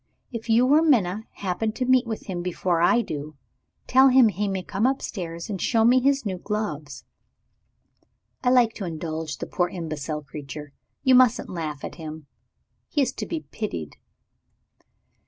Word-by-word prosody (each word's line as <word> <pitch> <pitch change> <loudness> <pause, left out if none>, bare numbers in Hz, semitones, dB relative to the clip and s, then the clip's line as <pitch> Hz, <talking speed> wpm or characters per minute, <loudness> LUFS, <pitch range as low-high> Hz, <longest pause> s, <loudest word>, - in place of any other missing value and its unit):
If 230 -1 -6
you 230 +3 +5
or 310 - +6
Minna 220 - +2
happen 205 +3 -2
to 255 - -2
meet 255 -1 +4
with 220 -2 -5
him 180 -3 -4
before 175 -1 0
I 235 +7 +4
do, 150 -2 -6 0.5
tell 265 +1 +6
him 255 -3 +6
he 205 +1 -2
may 190 -2 -2
come 200 +6 0
upstairs 175 -10 -3
and 195 -4 -4
show 225 -2 +3
me 250 +2 +6
his 275 0 +2
new 190 -3 -3
gloves. 155 -9 -4 1.4
I 250 - +3
like 245 -3 +4
to 200 - -4
indulge 160 -1 -4
the - - -5
poor 175 -1 0
imbecile 155 -3 -4
creature. 145 0 -8 0.3
You 260 -2 +5
mustn't 250 -2 +4
laugh 155 -5 -4
at - - -6
him 155 -1 -7 0.6
he 290 - +2
is 260 0 -1
to - - -5
be 330 -2 -3
pitied." 85 - -5
195 Hz, 165 wpm, -25 LUFS, 160-245 Hz, 1.4 s, or